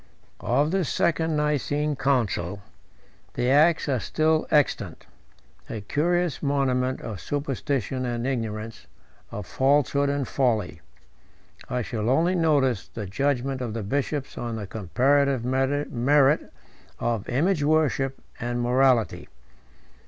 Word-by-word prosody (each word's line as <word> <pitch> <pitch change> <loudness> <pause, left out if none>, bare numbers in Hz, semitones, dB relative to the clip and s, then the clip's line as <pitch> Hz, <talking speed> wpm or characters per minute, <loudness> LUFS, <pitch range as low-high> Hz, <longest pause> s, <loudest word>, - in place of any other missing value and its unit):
Of 145 +6 +1
this 190 -6 0
second 160 -1 +1
Nicene 150 0 0
council 110 -8 -1 0.7
the 125 +1 +1
acts 155 +4 +4
are 130 -3 +1
still 155 +5 +1
extant; 150 -2 +1 0.6
a 110 - -5
curious 170 - 0
monument 130 -3 0
of 110 -5 -6
superstition 135 -3 -2
and 120 -1 -2
ignorance, 115 -4 -4 0.4
of 105 -2 -6
falsehood 140 +2 +2
and 140 -3 -1
folly. 110 - 0 0.9
I 125 -1 -1
shall 110 0 -2
only 165 +7 +3
notice 145 - +2
the 105 - -6
judgment 135 +5 -1
of 115 -3 -4
the 115 - -3
bishops 140 +5 -2
on 120 -1 -3
the 105 -2 -5
comparative 130 - +1
merit 135 +1 +2 0.5
of 115 -3 -2
image 155 +5 +1
worship 145 -3 +1 0.2
and 120 0 -2
morality. 125 -1 +2
135 Hz, 115 wpm, -25 LUFS, 120-145 Hz, 0.9 s, acts